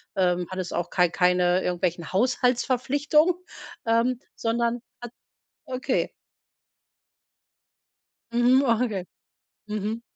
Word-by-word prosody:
ähm, 180 -2 +1
hattest 185 -1 -4
auch 175 - -2
kei 180 -2 +3
keine 180 0 +2
irgendwelchen 175 -1 -2
Haushaltsverpflichtungen, 255 - +2 0.5
ähm, 230 +2 +2 0.2
sondern 235 +1 -1 0.2
hat 240 -1 -8 0.5
okay. 255 0 -1 2.2
Mhm, 245 +3 +4
okay. 225 -6 0 0.6
Mhm. 215 +2 -3
230 Hz, 85 wpm, -25 LUFS, 180-250 Hz, 2.2 s, Mhm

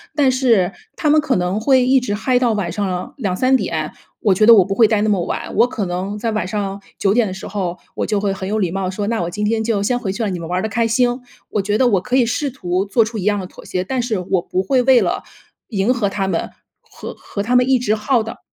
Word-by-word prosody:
但 280 -3 +3
是 235 -8 +2 0.2
他 - - -2
们 300 +1 +5
可 275 -3 0
能 180 +3 -1
会 260 +1 +4
一 265 +1 +4
直 245 -5 -3
嗨 245 +4 +1
到 240 -3 +2
晚 200 -5 -2
上 185 -3 -3
2-3 255 +3 +1
点， - - -2 0.3
我 205 - +3
觉 200 +4 +1
得 235 - +10
我 195 -4 +5
不 195 - -2
会 225 +2 +5
待 210 -1 +1
那 215 - +1
么 195 -4 +1
晚， - - -4
我 240 - +5
可 220 -5 -3
能 185 +3 -3
在 225 +2 -2
晚 215 -4 -2
上 200 -1 -3 0.2
9 195 - +2
点 235 -1 +2
的 - - -5
时 190 - -8
候， 185 -3 -3 0.2
我 - - -3
就 210 -2 0
会 200 -1 0
很 190 0 -5
有 215 - 0
礼 185 -5 0
貌 190 0 -2
说： 200 +2 -3
“那 225 0 -1
我 170 - -2
今 210 +4 -3
天 220 +1 0
就 215 -3 0
先 245 +4 0
回 205 -6 -3
去 225 +4 -3
了， 205 - -1
你 180 - -4
们 165 -1 -7
玩 180 - -1
儿 - - -3
的 - - 0
开心。” 235 +3 +1 0.3
我 210 - 0
觉 205 +2 0
得 255 - +3
我 200 -6 +2
可 245 - -2
以 255 -2 +4
试 260 +5 -1
图 185 -7 -2
做 215 +3 +2
出 220 0 -5
一 - - -4
样 205 -1 +2
的 190 - -5
妥 - - -13
协， 180 - -3
但 255 +6 -2
是 235 -3 -1
我 180 0 0
不 185 +1 -2
会 260 +4 +2
为 255 0 +5
了 - - -1 0.5
迎 205 +2 +1
合 225 -5 0
他 195 -1 -2
们， - - -2 0.3
和 - - -10
和 200 - -6
他 245 +4 0
们 250 +1 +4
一 265 - +5
直 235 -4 0
耗 220 +2 +1
的。 225 - -8
210 Hz, 300 characters per minute, -19 LUFS, 195-245 Hz, 0.5 s, 得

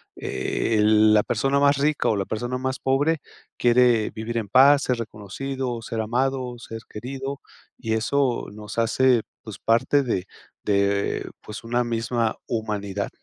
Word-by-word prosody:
eh, 110 -2 -1
la 105 0 +5
persona 135 +4 +1
más 140 0 +4
rica 150 +2 +1
o 110 - +2
la 100 - 0
persona 120 +5 -3
más 130 +1 -3
pobre 145 +5 +1 0.4
quiere 120 -2 +3
vivir 115 +1 -4
en 110 -3 -2
paz, 140 +6 +6
ser 125 -2 0
reconocido, 120 +3 -5
ser 115 0 -5
amado, 125 +2 -1
ser 115 -1 -8
querido 135 +4 -6 0.4
y 115 -3 -2
eso 130 +2 0
nos 105 0 -9
hace, 115 +1 +3 0.2
pues, 110 -3 -9
parte 115 +5 +2
de 95 -8 -2 0.4
de, 100 0 0
pues, 105 0 -9
una 120 +2 0
misma 115 0 -1
humanidad. 100 -3 -3
115 Hz, 145 wpm, -24 LUFS, 110-130 Hz, 0.4 s, paz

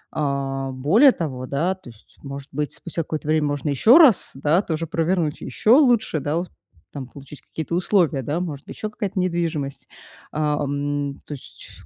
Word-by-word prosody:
А, 135 -2 -2
более 165 - +5
того, 130 - -4
да, 160 +8 0
то 185 -9 -14
есть, 115 -2 -19
может 140 0 -8
быть, 150 0 -2
спустя 170 -1 -5
какое-то 155 0 -5
время 155 -1 +2
можно 145 +1 -2
еще 220 - +6
раз, 290 - +6
да, 150 +6 +2
то 165 -6 -3
же 165 - -3
провернуть, 165 -1 0
еще 215 - 0
лучше, 240 - +4
да, 145 +3 -1
ус 175 +1 -3 0.4
там 135 -3 -7
получить 140 +2 -12
какие-то 160 +1 -6
условия, 175 -5 +2
да, 145 +7 -2
может, 155 -6 -5
еще 215 - -5
какая-то 205 -2 -3
недвижимость. 165 -6 -2 0.4
А, 150 -1 0
ам. 145 0 -2
То - - -7
есть 140 - -11
чш - - -12
150 Hz, 180 wpm, -22 LUFS, 140-175 Hz, 0.4 s, еще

